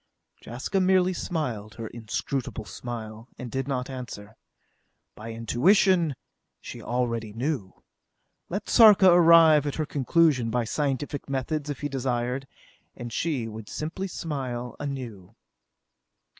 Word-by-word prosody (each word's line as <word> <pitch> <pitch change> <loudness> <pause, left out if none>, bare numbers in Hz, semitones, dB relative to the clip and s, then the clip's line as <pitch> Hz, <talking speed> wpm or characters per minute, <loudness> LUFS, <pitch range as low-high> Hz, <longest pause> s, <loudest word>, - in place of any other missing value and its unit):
Jaska 130 - -2
merely 185 0 +3
smiled 125 - -4
her 115 - -6
inscrutable 115 +1 -4
smile, 110 +3 -7
and 125 -2 -7
did 135 0 -2
not 125 -2 -2
answer. 115 -5 -8 0.8
By 115 +2 -8
intuition, 160 - +3 0.4
she - - -9
already 115 -3 -2
knew. 120 -5 -4 0.7
Let 200 +4 -4
Sarka 210 -5 +7
arrive 165 -3 +7
at 145 - -2
her 155 - -1
conclusion 140 -3 +2
by 120 +1 0
scientific 140 +3 -2
methods 145 +3 -2
if 145 - -5
he 145 - -1
desired, 130 -1 -2 0.5
and 120 -1 -7
she 140 -9 -1
would 110 -1 -9
simply 165 +5 -4
smile 130 -8 -4
anew. 115 -8 -6
130 Hz, 120 wpm, -26 LUFS, 115-155 Hz, 0.8 s, Sarka